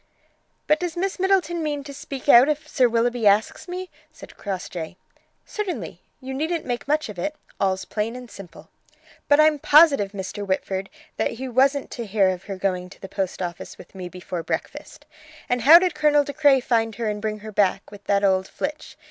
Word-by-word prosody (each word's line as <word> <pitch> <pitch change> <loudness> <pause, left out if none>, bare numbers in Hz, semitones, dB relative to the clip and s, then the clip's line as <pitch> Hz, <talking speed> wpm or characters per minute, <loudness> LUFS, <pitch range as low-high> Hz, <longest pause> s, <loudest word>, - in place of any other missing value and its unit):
"But 305 0 +3
does 350 -1 -4
Miss 385 +2 -2
Middleton 365 -3 +1
mean 295 -2 -2
me - - -12
to 280 0 -9
speak 275 -1 -8
out 260 +1 +8
if 305 +1 -2
Sir 255 -5 +2
Willoughby 235 -1 +1
asks 205 - +2
me?" 365 +1 -6 0.2
said - - -14
Crossjay. 180 -3 -6 0.5
"Certainly. 420 -4 -5 0.2
You 265 -1 -7
needn't 320 +4 -2
make 245 +1 -4
much 305 +2 +1
of 205 -5 -8
it. 300 - -3 0.2
All's 190 -1 0
plain 220 +2 -3
and 250 -1 -9
simple." 170 -7 -13 0.6
"But 290 +1 +5
I'm 305 -1 +5
positive, 285 -10 +5
Mr. 195 +1 -5
Whitford, 190 0 -2 0.3
he 260 +3 -2
wasn't 270 +3 +2
to 235 -3 -6
hear 195 -1 +3
of 185 0 -4
her 195 -2 -6
going 185 -1 -2
to - - -15
the 195 - -8
post 190 -1 -3
office 175 -1 -7
with - - -15
me 185 -2 -7
before 180 -1 -6
breakfast. 230 - -6 0.4
And 245 0 0
how 305 +8 +9
did 360 -1 +1
Colonel 300 -1 +3
De 285 - -6
Craye 285 -3 +4
find 225 -3 0
her 230 +1 -3
and 210 -1 -3
bring 215 0 -2
her 215 +1 -8
back, 200 -1 0
with 205 -1 -13
that 200 0 +1
old 190 -1 +2
Flitch? 300 +1 -6
235 Hz, 200 wpm, -23 LUFS, 195-295 Hz, 0.6 s, how